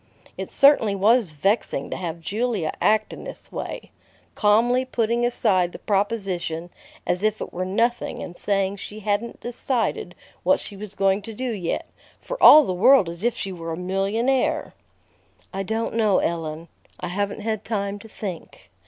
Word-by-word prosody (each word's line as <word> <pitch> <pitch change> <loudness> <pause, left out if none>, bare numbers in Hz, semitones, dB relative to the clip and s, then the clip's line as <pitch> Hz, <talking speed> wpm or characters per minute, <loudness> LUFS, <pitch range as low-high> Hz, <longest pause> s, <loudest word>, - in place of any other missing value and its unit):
It - - -6
certainly 275 -8 +5
was 210 -1 +3
vexing 150 -3 0
to - - -2
have 170 -2 -5
Julia 205 -2 -1
act 215 0 +2
in - - -9
this - - -10
way, - - -6 0.4
calmly 235 +4 +3
putting 235 -2 0
aside 190 -7 +1
the - - -7
proposition 195 -5 -2 0.3
as 180 - 0
if 215 0 +1
it - - -6
were 185 +1 -2
nothing 230 +5 0
and 175 - -8
saying 195 0 0
she 210 +2 -8
hadn't 210 +3 -2
decided 245 - -2 0.3
what - - +3
she 205 - -9
was 200 0 -8
going 195 +1 +2
to 220 +2 -9
do 255 +2 -2
yet, 185 -6 -3 0.3
for - - -6
all 305 +1 +10
the 185 - -2
world 215 0 +5
as 170 +3 -8
if 240 0 +1
she 195 - -4
were 165 -2 -5
a - - -5
millionaire! 200 +8 0 0.8
"I 195 - -2
don't 220 +4 -2
know, 215 -4 +3
Ellen. 165 -1 -2 0.3
I - - -4
haven't 200 +3 -2
had 220 -1 -2
time 200 -2 -3
to 225 - -12
think. 190 -6 -8
205 Hz, 170 wpm, -23 LUFS, 185-230 Hz, 0.8 s, all